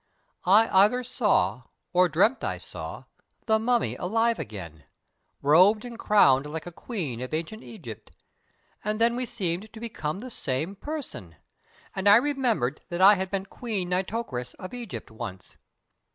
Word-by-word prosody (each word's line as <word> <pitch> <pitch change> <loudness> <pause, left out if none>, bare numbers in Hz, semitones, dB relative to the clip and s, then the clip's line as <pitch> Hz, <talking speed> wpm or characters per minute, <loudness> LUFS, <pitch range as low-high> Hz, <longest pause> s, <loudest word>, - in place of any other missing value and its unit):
I 215 +4 +6
either 210 +7 +4
saw, 190 - +1 0.3
or 180 0 +4
dreamt 210 - +2
I - - -1
saw, - - -8 0.4
the 220 -1 +3
Mummy 240 +1 +1
alive 225 +5 +1
again, 85 -9 -8 0.6
robed 185 - +5
and 235 -1 -8
crowned 140 -10 +4
like 155 +1 -6
a 175 - -7
queen 165 - -5
of 130 +4 -3
ancient 170 +8 -5
Egypt; 130 - -10 0.7
and 215 +1 -1
then 235 +1 +4
we 250 0 -2
seemed 200 -3 -2
to 220 - -11
become 185 -9 -4
the 250 +5 -8
same 155 - -3
person, 255 - -7 0.6
and 195 +1 +2
I 205 - +9
remembered 240 - +1
that 175 - -4
I 195 +2 +9
had 190 -1 -2
been 195 -1 -2
Queen 200 -4 -4
Nitocris 180 - -3
of 185 +5 -9
Egypt 240 - -7
once. 95 -4 -8
195 Hz, 150 wpm, -26 LUFS, 150-230 Hz, 0.7 s, I